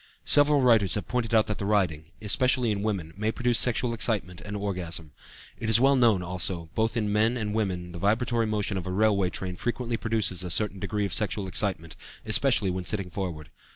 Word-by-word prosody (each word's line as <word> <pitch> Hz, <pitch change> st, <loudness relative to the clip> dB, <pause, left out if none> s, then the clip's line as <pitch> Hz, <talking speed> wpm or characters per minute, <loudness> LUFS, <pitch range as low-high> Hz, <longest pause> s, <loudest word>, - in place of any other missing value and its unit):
Several 145 Hz, -1 st, +4 dB
writers 115 Hz, -7 st, +4 dB
have 105 Hz, -, -4 dB
pointed 120 Hz, -2 st, -2 dB
out 110 Hz, -, +4 dB
that 105 Hz, -, -4 dB
riding, 95 Hz, -7 st, 0 dB, 0.2 s
especially 125 Hz, +3 st, +3 dB
in 100 Hz, -1 st, -2 dB
women, 95 Hz, -7 st, -3 dB
may 105 Hz, +3 st, -1 dB
produce 120 Hz, -1 st, +1 dB
sexual 125 Hz, -1 st, +1 dB
excitement 105 Hz, -6 st, -1 dB
and 105 Hz, 0 st, -6 dB
orgasm. 85 Hz, -6 st, -4 dB, 0.5 s
It 110 Hz, -, -3 dB
is 115 Hz, 0 st, +7 dB
well 135 Hz, +2 st, +4 dB
known, 115 Hz, -8 st, +3 dB
also, 90 Hz, 0 st, -1 dB
that 80 Hz, +1 st, -19 dB
both 115 Hz, +2 st, -1 dB
in 105 Hz, -2 st, -1 dB
men 110 Hz, +3 st, +2 dB
and 105 Hz, -3 st, -3 dB
women 90 Hz, -5 st, -2 dB
the 85 Hz, -, -8 dB
vibratory 115 Hz, +3 st, +1 dB
motion 105 Hz, -2 st, -2 dB
of 95 Hz, -, -5 dB
a -, -, -3 dB
railway 100 Hz, -1 st, +2 dB
train 90 Hz, 0 st, -5 dB
frequently 120 Hz, +1 st, -3 dB
produces 110 Hz, -6 st, 0 dB
a 90 Hz, -, -5 dB
certain 100 Hz, +2 st, 0 dB
degree 105 Hz, +2 st, -2 dB
of 95 Hz, -, -4 dB
sexual 105 Hz, -1 st, -1 dB
excitement, 90 Hz, -4 st, -2 dB, 0.3 s
especially 110 Hz, -3 st, +3 dB
when 90 Hz, 0 st, -4 dB
sitting 100 Hz, -3 st, -2 dB
forward. 85 Hz, -6 st, -5 dB
105 Hz, 200 wpm, -26 LUFS, 90-115 Hz, 0.5 s, is